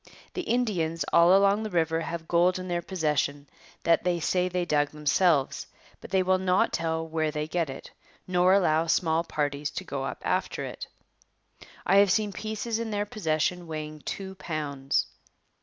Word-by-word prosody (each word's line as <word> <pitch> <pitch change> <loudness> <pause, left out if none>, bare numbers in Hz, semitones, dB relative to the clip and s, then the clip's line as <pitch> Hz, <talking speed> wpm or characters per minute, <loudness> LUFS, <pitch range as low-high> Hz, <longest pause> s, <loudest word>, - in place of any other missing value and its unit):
The 365 - -2
Indians 195 - 0
all 170 +3 +7
along 200 +1 +3
the 215 - -3
river 165 -3 +1
have 165 0 -5
gold 175 +2 +3
in 185 0 -6
their 175 -1 -1
possession 150 -5 -1 0.4
that 165 0 +3
they 175 -1 +1
say 180 +2 +1
they 180 -1 -1
dug 145 -3 +1
themselves, 150 -1 +1 0.3
but - - -11
they 190 -1 +2
will 185 0 +2
not 185 0 +2
tell 165 -1 -1
where 160 -1 -1
they 150 0 -3
get 165 -1 -1
it, 135 - -9 0.3
nor 180 0 +3
allow 165 -4 +2
small 165 0 +2
parties 145 -2 -2
to - - -6
go 140 -1 -4
up 135 - -5
after - - -1
it. - - -7 1.0
I 195 - +4
have 200 -1 +6
seen 205 +1 +1
pieces 220 +2 -3
in 230 -1 -3
their 205 -1 -1
possession 180 -4 -1
weighing 155 -1 -6
two 190 +4 -5
pounds. 145 -6 -2
170 Hz, 175 wpm, -27 LUFS, 155-190 Hz, 1.0 s, all